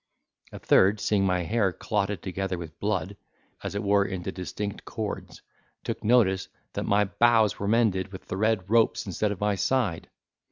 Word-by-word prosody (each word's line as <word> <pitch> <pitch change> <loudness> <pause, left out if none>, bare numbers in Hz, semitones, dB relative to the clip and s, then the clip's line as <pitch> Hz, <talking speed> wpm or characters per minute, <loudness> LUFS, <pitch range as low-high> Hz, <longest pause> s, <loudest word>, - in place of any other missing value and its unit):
A - - -8
third, 100 +3 +4
seeing 100 -2 +1
my 90 -1 +1
hair 105 +1 +1
clotted 100 0 -2
together 95 0 -3
with 80 -3 -9
blood, - - -1 0.5
as - - -5
it 100 - -2
were 100 0 +3
into 95 -1 -4
distinct 100 +2 -5
cords, 95 -6 -6 0.4
took - - -4
notice, 105 -5 +3 0.3
that - - -3
my 105 +1 +4
bows 110 -1 +3
were 100 - -2
mended 105 -4 +2
with 95 - -10
the - - -5
red 105 -2 +1
ropes, 115 +2 +2
instead 100 +2 -1
of 100 - -5
my 105 0 +1
side. 105 -4 0
100 Hz, 170 wpm, -27 LUFS, 95-105 Hz, 0.5 s, third